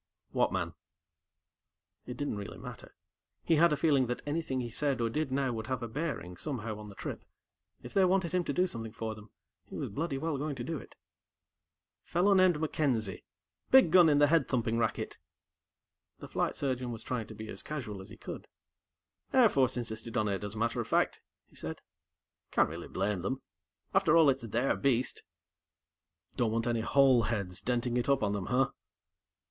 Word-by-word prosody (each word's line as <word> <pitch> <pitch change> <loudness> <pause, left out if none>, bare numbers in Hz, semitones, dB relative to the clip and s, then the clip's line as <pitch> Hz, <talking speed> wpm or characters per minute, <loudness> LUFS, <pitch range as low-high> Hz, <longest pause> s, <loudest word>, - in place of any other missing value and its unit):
"What - - +2
man?" - - -2 1.3
It 125 - -6
didn't 145 -7 -2
really 100 -1 -7
matter. - - -10 0.5
He 165 - +3
had 170 +1 +6
a 150 - +2
feeling 140 -4 +3
that 125 - -3
anything 145 -3 -1
he 120 -2 -4
said 140 +1 +1
or 115 -1 0
did 150 +1 -1
now 135 -2 +1
would 110 -1 -5
have 130 -3 -2
a - - -2
bearing, 115 - -4
somehow, 115 - -4
on 105 -1 -9
the 100 - -12
trip. - - -6 0.6
If 120 - -9
they 195 - +4
wanted 185 -2 +2
him 180 -1 +2
to - - -1
do 180 - +3
something 115 -10 -5
for 110 -1 -4
them, 105 0 -13 0.4
he - - -8
was - - -3
bloody 145 +6 -2
well 150 0 -2
going 145 0 -2
to 120 - -5
do 160 +3 -3
it. - - -14 1.1
"Fellow 185 +4 +2
named 185 -4 +5
MacKenzie. 130 - -1 0.4
Big 260 -11 +7
gun 175 -2 +8
in 145 - +4
the 145 - +6
head 155 -1 +3
thumping 115 -2 0
racket." 115 -1 -2 1.0
The - - -9
Flight - - -1
Surgeon 130 -3 -2
was 115 - -6
trying 120 -4 -3
to - - -10
be 110 - -7
as - - -4
casual 120 -10 -5
as 95 - -11
he - - -11
could. - - -8 0.8
"Air 250 -4 +6
Force 130 -6 +2
insisted 115 -1 -4
on 105 -2 +2
it, 100 0 -2
as 105 +1 -5
a - - -6
matter 115 +1 0
of - - -6
fact," - - +1 0.2
he - - -25
said. - - -4 0.7
"Can't - - +3
really - - -7
blame 100 -1 -1
them. 130 +8 -3 0.5
After 155 - +5
all, 155 -4 +7
it's 130 -3 -4
their 120 +5 +1
beast." 130 -2 0 1.2
"Don't 120 - +2
want 115 +1 0
any 120 -2 +1
hole 130 +1 +5
heads 100 -6 -2
denting 120 0 0
it 120 +2 0
up 140 -5 +3
on 100 -1 +1
them, 100 -2 -3
huh?" 135 +2 +2
125 Hz, 195 wpm, -31 LUFS, 110-150 Hz, 1.3 s, gun